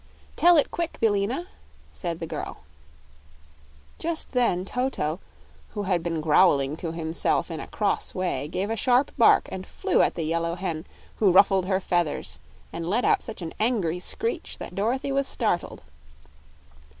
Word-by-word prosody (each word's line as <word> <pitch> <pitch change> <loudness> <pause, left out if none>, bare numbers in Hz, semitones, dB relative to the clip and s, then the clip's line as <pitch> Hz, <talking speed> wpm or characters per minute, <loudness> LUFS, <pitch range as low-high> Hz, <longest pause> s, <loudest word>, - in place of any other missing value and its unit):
"Tell 350 -1 +6
it 295 - +2
quick, 340 -1 -3
Billina!" 225 - +1 0.5
said 170 -3 -4
the 165 - -4
girl. - - -6 1.4
Just 330 0 -1
then 235 -8 +1
Toto, 200 - -2 0.6
who 205 - -2
had 185 -3 +1
been 165 -1 -2
growling 150 -3 +4
to 165 -1 -4
himself 165 +1 0
in 160 - -4
a - - -7
cross 205 -2 -1
way, 175 -7 -2
gave 190 +6 -2
a - - 0
sharp 250 +5 +2
bark 235 - +5
and 190 0 -6
flew - - +1
at - - +2
the 165 - -2
yellow 170 +1 -1
hen, 170 -3 -4 0.3
who 200 -4 +4
ruffled 190 0 +5
her 190 -1 +1
feathers 175 -5 -1 0.3
and 165 0 -4
let 230 +6 +1
out 425 -2 +3
such 220 -6 -6
an 160 - -6
angry 205 -7 +1
screech 455 - -2
that - - -8
Dorothy 240 +8 -1
was 275 0 +1
startled. 210 - -1
190 Hz, 160 wpm, -25 LUFS, 170-240 Hz, 1.4 s, Tell